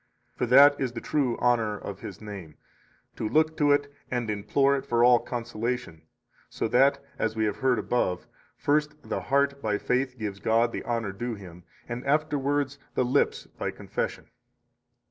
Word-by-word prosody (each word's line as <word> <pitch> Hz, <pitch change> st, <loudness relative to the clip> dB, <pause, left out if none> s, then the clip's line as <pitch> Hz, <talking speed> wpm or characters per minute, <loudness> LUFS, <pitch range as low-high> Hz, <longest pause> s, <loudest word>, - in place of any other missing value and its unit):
For 125 Hz, -, -1 dB
that 140 Hz, +4 st, +7 dB
is 130 Hz, -3 st, -1 dB
the 115 Hz, -, -4 dB
true 135 Hz, -3 st, 0 dB
honor 115 Hz, -4 st, +1 dB
of 100 Hz, -1 st, -7 dB
His 95 Hz, -, -9 dB
name, 100 Hz, -7 st, -8 dB, 0.6 s
to 110 Hz, -, -3 dB
look 155 Hz, +5 st, +2 dB
to 145 Hz, -1 st, +3 dB
it 145 Hz, 0 st, +1 dB, 0.2 s
and 120 Hz, -3 st, -1 dB
implore 135 Hz, +7 st, +2 dB
it 135 Hz, -, -3 dB
for 120 Hz, 0 st, +2 dB
all 120 Hz, 0 st, +7 dB
consolation, 120 Hz, -6 st, -4 dB, 0.5 s
so -, -, -2 dB
that 135 Hz, +4 st, +4 dB, 0.2 s
(as 110 Hz, 0 st, 0 dB
we 110 Hz, 0 st, +1 dB
have 105 Hz, -, -1 dB
heard 130 Hz, -2 st, +2 dB
above) 105 Hz, -5 st, -1 dB, 0.3 s
first 150 Hz, +1 st, +1 dB
the -, -, -2 dB
heart 140 Hz, 0 st, +1 dB
by 105 Hz, -2 st, 0 dB
faith 130 Hz, +3 st, -1 dB
gives 105 Hz, -3 st, -4 dB
God 115 Hz, +2 st, +2 dB
the -, -, -4 dB
honor 115 Hz, -4 st, -1 dB
due 115 Hz, +4 st, -4 dB
Him, 90 Hz, -4 st, -12 dB, 0.2 s
and 120 Hz, +1 st, -5 dB
afterwards 145 Hz, -1 st, 0 dB, 0.2 s
the 130 Hz, -, +2 dB
lips 130 Hz, +3 st, +1 dB
by -, -, -5 dB
confession. -, -, -4 dB
120 Hz, 170 wpm, -27 LUFS, 110-140 Hz, 0.6 s, that